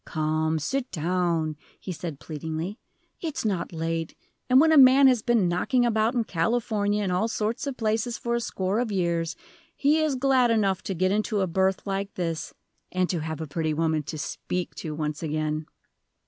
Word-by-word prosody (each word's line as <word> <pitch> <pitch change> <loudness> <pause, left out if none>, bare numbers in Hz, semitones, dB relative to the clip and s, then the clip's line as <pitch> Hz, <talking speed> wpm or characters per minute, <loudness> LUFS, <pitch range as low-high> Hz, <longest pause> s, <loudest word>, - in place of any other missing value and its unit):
"Come, 155 0 0
sit 260 - -2
down," 165 -2 0 0.2
he 190 - -6
said, 165 -4 -6
pleadingly; 160 - -5 0.4
"it's 315 -8 -3
not 195 -5 -1
late, 165 0 -3 0.3
and 255 +1 +7
when 320 +2 +5
a - - +6
man 265 +1 +8
has 255 -4 +5
been 230 -5 +2
knocking 240 +9 +1
about 225 +1 +1
in 235 - +2
California 210 +2 0
and 190 - -1
all 180 +5 +1
sorts 225 +4 -2
of 275 - -4
places, 225 +2 0
for 235 - -2
a 235 - +1
score 195 -1 -1
of 240 -3 -1
years, 170 -3 0 0.4
he 295 +3 +3
is 310 -3 +1
glad 260 -2 +3
enough 200 -5 +2
to 195 - -2
get 185 +2 +1
into 210 0 0
a - - +2
berth 190 +1 0
like 195 0 -3
this, 165 -3 -3 0.4
and 185 -1 +1
to 175 - -1
have 160 0 -4
a - - -3
pretty 155 +1 -1
woman 160 -1 +1
to 155 +2 -6
speak 180 +4 -4
to 155 -3 -5
once 150 -1 -3
again." 155 -1 -2
185 Hz, 190 wpm, -26 LUFS, 160-230 Hz, 0.4 s, man